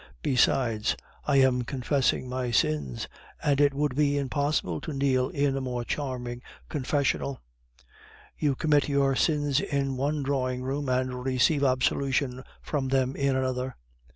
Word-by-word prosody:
Besides, 115 -4 +2 0.3
I 145 - +2
am 130 -2 +4
confessing 130 +1 0
my 125 0 -2
sins, 75 - 0 0.4
and 145 -1 +2
it 145 -1 +5
would 145 -1 -1
be 145 0 +2
impossible 140 - -1
to 155 - -5
kneel 135 -2 +1
in 140 -1 0
a 135 - -2
more 125 -2 -3
charming 125 -4 -4 0.3
confessional; 140 -1 -1 1.0
you 145 -3 0
commit 150 -1 +2
your 140 -1 +2
sins 145 -1 +2
in 140 -7 -1
one 145 +2 0
drawing 130 -2 -1
room, 135 +1 -2
and 125 0 -1
receive 135 +3 +2
absolution 130 0 +1 0.2
for 145 - -1
them 130 0 0
in 140 -1 +1
another." 130 0 -1
135 Hz, 140 wpm, -27 LUFS, 125-140 Hz, 1.0 s, it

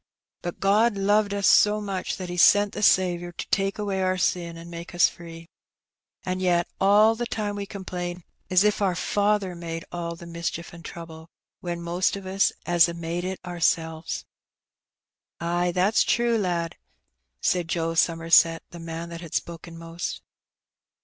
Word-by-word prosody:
But 175 - -5
God 210 +2 +3
loved 205 +1 +2
us 200 -1 -1
so 210 0 +5
much 195 -3 -3
that 185 - -5
He 175 - -5
sent 205 +3 +5
the - - -5
Saviour 175 -3 +3
to - - -6
take 195 0 0
away 200 -2 -2
our 185 0 +1
sin 170 -2 -1
an' 165 +1 -10
make 170 +1 -8
us 175 - +6
free. 165 -1 -10 0.8
An' 185 0 -2
yet 175 -2 +2
all 210 +3 +5
the 240 +1 -4
time 210 -3 -3
we 200 -1 -5
complain 180 -3 -5 0.3
as 185 +1 +5
if 210 0 +2
our 190 -3 +2
Father 200 +1 +1
made 165 -1 -6
all 170 -1 -4
the 170 - -11
mischief 170 0 -5
an' 170 - -11
trouble, 165 0 -10 0.3
when 170 -1 -5
most 175 +3 0
o' - - -7
us 195 +1 +2
'as 175 -1 +4
a 170 - -5
made 170 +1 -4
it 190 +1 -4
oursels." 165 -2 -1 1.1
''Ay, 175 +1 0
that's 185 +5 +3
true, 235 -1 +2
lad," 175 -5 -1 0.6
said 175 -2 +1
Dick 165 -1 -1
Somerset, 165 0 +4
the 175 - -9
man 165 0 -6
that 170 0 -8
had 165 -3 -8
spoken 170 0 -4
most. 165 +1 -6
175 Hz, 170 wpm, -25 LUFS, 170-195 Hz, 1.1 s, us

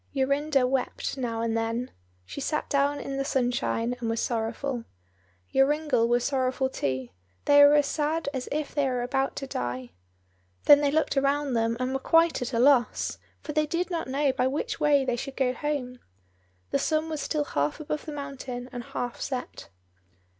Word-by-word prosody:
Jorinda 280 0 +2
wept 260 +1 -1
now 235 -4 -2
and 230 -1 0
then: 230 +2 -2 0.3
she 280 - -7
sat 305 +2 -1
down 285 +1 +2
in 275 0 -4
the 275 - 0
sunshine 245 -2 0
and 230 -2 -2
was 225 0 -1
sorrowful. 235 +2 -2 0.7
Joringel 270 -3 +3
was 240 0 +2
sorrowful 260 -1 0
too; 130 - -2 0.4
they 285 0 +7
were 290 +1 +7
as 295 -1 +4
sad 305 +2 -1
as 260 -2 -4
if 300 0 -2
they 285 -2 +1
were 250 -1 -1
about 270 +2 -1
to 275 - -4
die. 125 - -4 0.7
Then 290 0 +8
they 290 - +3
looked 305 -1 +1
around 280 0 +1
them, 230 0 +1
and 255 +1 -1
were 270 - 0
quite 330 +2 +3
at 250 - -3
a 235 - -1
loss, 250 -2 +3 0.2
for - - -5
they 305 0 +2
did 345 +4 -2
not 335 -2 -2
know 275 +1 +1
by 255 -1 +1
which 280 +5 -2
way 290 -3 +4
they 250 -2 0
should 270 +3 -6
go 255 -2 +2
home. 255 -3 -3 0.7
The - - +2
sun 315 0 0
was 310 -2 -3
still 300 -2 0
half 145 - -1
above 305 0 -4
the 310 - -5
mountain 270 -3 -6
and 245 -2 -6
half 245 +1 -5
set. 255 -2 -5
270 Hz, 185 wpm, -27 LUFS, 245-290 Hz, 0.7 s, Then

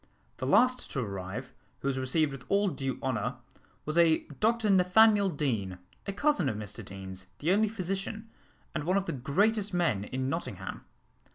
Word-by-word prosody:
The - - -3
last 255 0 +4
to 135 - -1
arrive, 100 +4 -5 0.3
who - - -2
was 135 -1 0
received 140 +4 +2
with 135 -2 -8
all 200 0 +3
due 135 -6 -3
honour, 125 -1 -1 0.5
was 155 +3 +1
a 165 -2 +4 0.2
Dr 225 -1 +2
Nathaniel 200 +2 +5
Deane, 115 - -2 0.3
a - - 0
cousin 215 - +2
of 110 - -3
Mr 105 -1 -6
Deane's, 95 -1 -8
the 160 +4 0
only 210 +2 +3
physician, 195 +2 -4 0.5
and 155 - -2
one 185 +3 +2
of 195 - 0
the - - -2
greatest 200 - +1
men, 105 - +1
in 130 +2 -3
Nottingham. 100 - -4
155 Hz, 170 wpm, -30 LUFS, 125-200 Hz, 0.5 s, Nathaniel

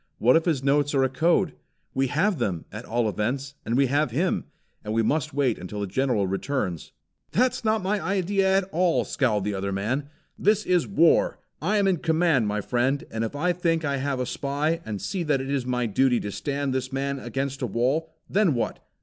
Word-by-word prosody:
What 125 +3 +4
if 165 - +3
his 155 -7 0
notes 145 +1 +2
are 135 - +4
a 130 - +2
code? 165 +5 +2 0.4
We 135 0 +1
have 165 +6 +1
them, 95 -8 -2
at 105 +4 -7
all 120 0 0
events; 130 +7 -2
and 115 - -1
we 140 - +5
have 145 +2 +1
him; 165 +10 0 0.4
and 105 - -3
we 115 - +3
must 145 +5 0
wait 135 -5 +1
until 105 +3 -6
the - - 0
General 115 +1 0
returns." 95 - -2 0.4
"That's 250 +2 +1
not 220 -2 +1
my 200 +2 0
idea 195 0 +2
at 195 - +2
all!" 175 0 +2
scowled 110 -8 0
the 105 +1 -1
other 100 0 -2
man. 125 +9 -2 0.3
"This 210 +1 +2
is 180 -3 +2
war. 170 -4 +3 0.2
I 205 +7 +1
am 200 -1 +3
in 190 -2 +2
command, 160 -7 +2
my 105 0 -1
friend, 130 +5 0
and 115 0 -2
if 115 - -4
I 175 +5 +1
think 165 -2 0
I 140 -1 0
have 135 -1 -2
a 125 - 0
spy, 145 +6 -1
and 105 -2 -3
see 190 - -3
that 150 -4 +1
it 135 +1 -4
is 135 -3 -1
my 125 -1 0
duty 125 +3 +2
to 105 - -4
stand 140 +3 -2
this 130 -1 -2
man 140 +1 -2
up 120 - -9
against 135 +3 -3
a 125 - 0
wall, 130 +9 0 0.2
then 195 -7 +2
what? 120 - -2
140 Hz, 220 wpm, -25 LUFS, 120-165 Hz, 0.4 s, we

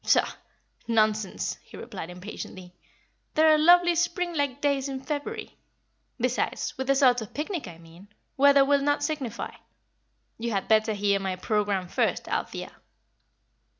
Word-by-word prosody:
"Pshaw! - - +3 0.5
nonsense!" 215 -3 +1
he - - -13
replied, 190 -8 -7
impatiently. 180 -1 -9 0.6
"There 315 0 +6
are - - +5
lovely 350 +2 +6
spring 345 +1 0
like 285 -3 -1
days 280 -1 0
in 265 -1 -4
February. 315 +11 -5 0.6
Besides, 250 +1 -1
with 265 - -4
the 275 - +4
sort 255 -3 +4
of 215 - -9
picnic 310 - -3
I 170 -2 -10
mean, 165 +4 -16 0.3
weather 280 0 +6
will 285 0 +3
not 290 +1 +1
signify. 290 -7 -3 0.9
You 235 0 -2
had 195 -1 -1
better 220 0 +3
hear 200 -1 +1
my 190 -1 -2
programme 200 -1 -1
first, - - 0
Althea." - - -3
255 Hz, 145 wpm, -27 LUFS, 205-290 Hz, 0.9 s, There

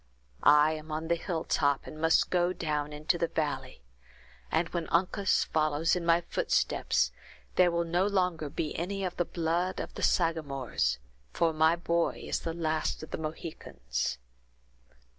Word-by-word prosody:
I 150 +1 +6
am 155 0 -6
on 160 +1 -3
the 170 - +4
hilltop 160 -5 0
and 155 - -9
must 165 0 +3
go 180 0 +2
down 150 -3 -2
into 155 +3 -1
the 170 - +1
valley; 135 - -3 0.7
and 165 +1 +2
when 170 -2 -3
Uncas 185 +3 +2
follows 155 +1 +1
in 180 - -2
my 170 +1 +5
footsteps 170 - +1 0.4
there 180 -1 +5
will 170 0 0
no 175 +3 +1
longer 180 -6 0
be 150 - -3
any 195 +3 -2
of 180 -2 -3
the 175 - +1
blood 170 +3 -1
of - - -5
the - - -7
Sagamores, 140 - +1 0.4
for 165 -1 +2
my 160 +1 +4
boy 170 0 0
is - - -1
the 165 - -4
last 155 -2 -1
of 155 - -10
the - - -3
Mohicans." 155 - -4
165 Hz, 160 wpm, -30 LUFS, 155-170 Hz, 0.7 s, I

